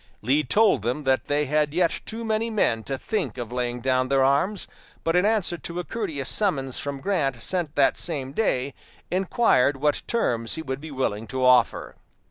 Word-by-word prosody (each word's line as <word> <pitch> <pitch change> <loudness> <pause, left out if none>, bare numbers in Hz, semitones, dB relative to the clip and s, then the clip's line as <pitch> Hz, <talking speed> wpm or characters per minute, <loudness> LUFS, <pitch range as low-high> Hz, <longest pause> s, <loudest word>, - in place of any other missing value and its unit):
Lee 140 +6 +2
told 210 - +3
them 125 +7 -2
that 130 -1 +1
they 145 +1 +1
had 150 +1 0
yet 175 -2 +1
too 230 +1 -5
many 220 +1 0
men 125 - +1
to 135 - -3
think 215 - -3
of 120 -2 -5
laying 125 -1 -2
down 130 0 +1
their 135 -1 +3
arms, 145 +10 +1 0.4
but 165 +1 +1
in 180 +2 +4
answer 205 -6 0
to 170 +1 -5
a - - -2
courteous 165 - -4
summons 140 - 0
from 140 -1 -4
Grant 140 -11 -1
sent 175 -5 -2
that 140 -2 +3
same 140 -6 -3
day, 140 - 0 0.4
inquired 180 - +2
what 150 +1 +1
terms 115 - 0
he 160 - -5
would 130 -1 -4
be 160 - -8
willing 115 -6 -2
to 130 -1 -1
offer. 125 -2 +3
145 Hz, 190 wpm, -25 LUFS, 130-180 Hz, 0.4 s, in